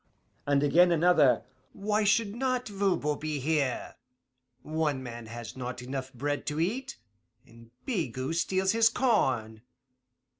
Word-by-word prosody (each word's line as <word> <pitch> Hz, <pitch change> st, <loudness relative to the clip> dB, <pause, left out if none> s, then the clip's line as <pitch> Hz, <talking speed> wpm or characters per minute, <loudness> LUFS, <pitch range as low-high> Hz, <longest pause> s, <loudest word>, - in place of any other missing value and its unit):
And 140 Hz, 0 st, +3 dB
again, 175 Hz, +5 st, +5 dB
another, 155 Hz, -8 st, +4 dB, 0.3 s
'Why 210 Hz, +1 st, 0 dB
should 210 Hz, 0 st, +2 dB
not 255 Hz, +1 st, -1 dB
Voban 195 Hz, -8 st, 0 dB
be 155 Hz, -1 st, -3 dB
here? 140 Hz, -2 st, -1 dB, 0.7 s
One 150 Hz, -3 st, -1 dB
man 120 Hz, -2 st, -8 dB
has 115 Hz, 0 st, -8 dB
not 125 Hz, -1 st, -5 dB
enough 130 Hz, +1 st, -5 dB
bread 145 Hz, +3 st, -3 dB
to 150 Hz, +1 st, -2 dB
eat, 235 Hz, +11 st, -2 dB, 0.5 s
and 115 Hz, -2 st, -17 dB, 0.2 s
Bigot 160 Hz, -, -2 dB
steals 190 Hz, +3 st, +1 dB
his 225 Hz, +1 st, +4 dB
corn. 130 Hz, -, +1 dB
150 Hz, 125 wpm, -29 LUFS, 130-200 Hz, 0.7 s, again